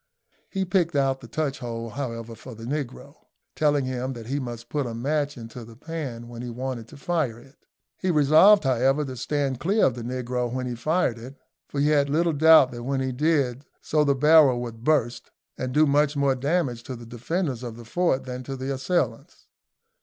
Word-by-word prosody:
He 195 -1 -2
picked 175 -4 +1
out 135 -1 +1
the - - -10
touch 150 -4 -2
hole, 115 -2 -5
however, 115 -3 -5
for 120 +2 -11
the 115 - -11
negro, 125 - -5 0.4
telling 145 -3 +2
him 130 +1 -3
that 115 -2 -9
he 135 +5 -2
must 120 -3 -6
put 145 -2 -2
a 115 - -5
match 145 +3 -1
into 115 +1 -9
the 115 0 -13
pan 135 -5 -6
when 120 0 -8
he 125 - -5
wanted 125 -1 -5
to 145 - -13
fire 140 -6 -1
it. 135 +4 -19 0.3
He 185 - -1
resolved, 160 +6 +6
however, 135 +3 +2
to 130 -1 -6
stand 135 +1 -1
clear 200 +6 +2
of 130 - +2
the 120 - -7
negro 125 0 -3
when 130 0 -3
he 125 - -3
fired 125 0 0
it; 130 +4 -10 0.3
for 140 - -4
he 145 +1 +3
had 145 -2 +3
little 165 +3 +2
doubt 160 -3 +6
that 120 -1 -7
when 135 +2 -1
he 130 0 -1
did 140 -2 +1 0.2
so 150 -1 +1
the 140 -1 +2
barrel 150 -3 +6
would 115 -1 -8
burst, 125 -5 +1 0.3
and 130 0 -4
do 150 +4 +4
much 145 0 +2
more 140 -1 +3
damage 135 -2 -1
to 130 - -5
the 120 0 -10
defenders 125 +3 -3
of 120 -2 -7
the 120 - -11
fort 170 +2 0
than 125 0 -6
to 135 +1 -6
the 135 +1 -3
assailants. 135 -4 -2
135 Hz, 205 wpm, -25 LUFS, 120-150 Hz, 0.4 s, resolved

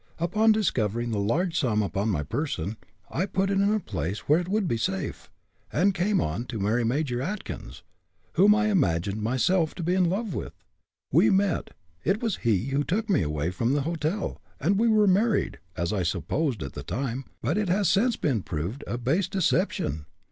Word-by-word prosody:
Upon 210 +7 +3
discovering 120 - 0
the 105 - -1
large 165 - 0
sum 110 -7 +1
upon 100 +2 -1
my 80 -8 0
person, 110 - -3 0.4
I 185 +4 0
put 195 +1 0
it 195 0 +2
in 200 +1 +3
a 215 - +2
place 90 - -4
where 150 +3 +3
it 175 - -4
would 200 0 0
be 115 - 0
safe, 95 -4 -3 0.4
and 195 +5 +3
came 195 +3 +1
on 85 +11 -2
to 115 -3 -5
marry 110 +5 +1
Major 125 +1 0
Atkins, 195 +8 -6 0.5
whom 205 +2 +6
I 215 0 +2
imagined 100 - +1
myself 155 - +1
to 175 - -5
be 175 +2 +1
in 185 -1 +3
love 200 +1 -2
with. - - -5 0.6
We 110 - +6
met 195 -2 +1 0.3
it 195 +3 +1
was 225 -5 -1
he 110 -4 +1
who 140 +2 +1
took 210 +7 -1
me 185 - +3
away 75 +1 -1
from 115 +7 0
the 145 - +2
hotel 165 +5 -2 0.2
and 195 +8 +2
we 230 - +3
were 215 -2 +5
married, 205 - +2 0.2
as 85 +4 -1
I 100 - 0
supposed, 95 - -1
at 70 - -6
the - - -6
time, 125 +7 -3
but - - -1
it 210 -3 0
has 195 +1 +2
since 225 +7 +3
been 130 -9 0
proved 90 - -4
a 120 - -2
base 145 +10 +1
deception. 180 - 0
150 Hz, 195 wpm, -26 LUFS, -, 0.6 s, whom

